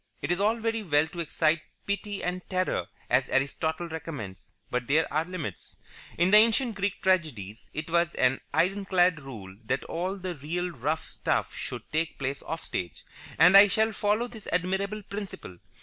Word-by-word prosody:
It - - -1
is 175 - +1
all 210 +3 +3
very 225 -1 -1
well 155 -5 +2
to 175 - -8
excite 155 0 +1 0.2
pity 200 0 -3
and 180 +1 -2
terror, 185 -1 0 0.2
as 125 +1 +2
Aristotle 160 +5 0
recommends, 135 - -7 0.2
but 125 -1 -1
there 155 +3 +4
are 155 +2 +1
limits. 165 - -6 0.4
In 175 +2 +3
the 210 - +9
ancient 230 +2 +4
Greek 200 -1 -2
tragedies 145 - 0
it 155 +1 -5
was 170 0 +1
an 130 +1 +2
ironclad 185 -2 +2
rule 105 -9 -9
that 130 +4 -1
all 180 +3 -2
the 185 -1 -4
real 170 +4 -3
rough 155 +2 -2
stuff - - -1
should - - -5
take 155 +1 -1
place 135 +1 -3
off 165 - -5
stage, 85 -5 -5 0.3
and 180 +4 +7
I 200 +1 +11
shall 220 +2 +2
follow 210 +2 +1
this 225 -4 -11
admirable 190 +4 -1
principle. 195 - -7
175 Hz, 170 wpm, -28 LUFS, 145-195 Hz, 0.4 s, I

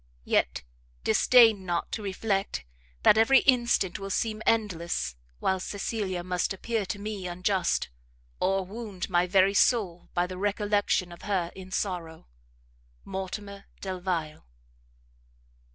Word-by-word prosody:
Yet - - +1 0.4
disdain 225 - +5
not 175 -2 -2
to 220 - -3
reflect 195 - -2 0.4
that 220 - +6
every 265 +4 +6
instant 240 -8 +2
will 195 0 -5
seem 215 +2 -1
endless, 175 - 0 0.2
while 190 - 0
Cecilia 195 -2 -3
must 180 +1 -1
appear 220 0 -2
to 205 - -3
me 205 -2 -5
unjust, 180 - 0 0.5
or 195 0 +1
wound 200 -2 -6
my 175 0 +3
very 190 +1 +4
soul 195 -6 +2
by 175 - +2
the 180 0 -7
recollection 205 -2 +1
of 170 - -11
her 185 -4 -1
in 190 -1 -10
sorrow. 175 -4 -3 0.8
MORTIMER 200 +1 -6
DELVILE. 180 - -3
195 Hz, 120 wpm, -28 LUFS, 180-210 Hz, 0.8 s, that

